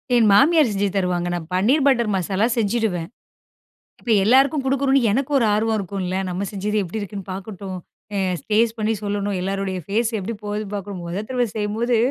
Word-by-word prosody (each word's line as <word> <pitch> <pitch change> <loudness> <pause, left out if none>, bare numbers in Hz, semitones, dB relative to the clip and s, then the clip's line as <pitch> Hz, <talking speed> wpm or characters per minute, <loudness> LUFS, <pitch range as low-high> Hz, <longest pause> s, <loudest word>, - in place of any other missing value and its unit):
என் 230 -2 +5
மாமியார் 295 +6 +5
செஞ்சு 200 0 0
தருவாங்க. 180 -2 0
நான் 170 -2 -4
பன்னீர் 240 +11 +3
பட்டர் 235 -5 +3
மசாலா 190 +3 0
செஞ்சுடுவேன். 205 -6 0 0.9
இப்ப 240 - -5
எல்லாருக்கும் 270 +5 +4
குடுக்கணும்னு 270 0 +2
எனக்கு 270 +4 -1
ஒரு 255 - +3
ஆர்வம் 220 +1 +1
இருக்கும்ல! 185 -1 -3
"நம்ம 180 +2 -3
செஞ்சது 210 +1 -2
எப்படி 190 +5 -5
இருக்குன்னு 200 -1 -6
பாக்கட்டும். 190 -1 -6 0.4
அ - - 0 0.3
டேஸ்ட் 225 +2 +3
பண்ணி 215 +1 +1
சொல்லணும். 205 -1 -2
எல்லோருடைய 195 0 -2
ஃபேஸ் 220 +3 0
எப்படி 205 +4 -4
போகுதுன்னு 210 0 -4
பார்க்கணும்!" 200 -2 -5
மொத 175 +4 -3
தடவை 250 -2 0
செய்யும்போது 220 +3 0
205 Hz, 165 wpm, -22 LUFS, 195-235 Hz, 0.9 s, என்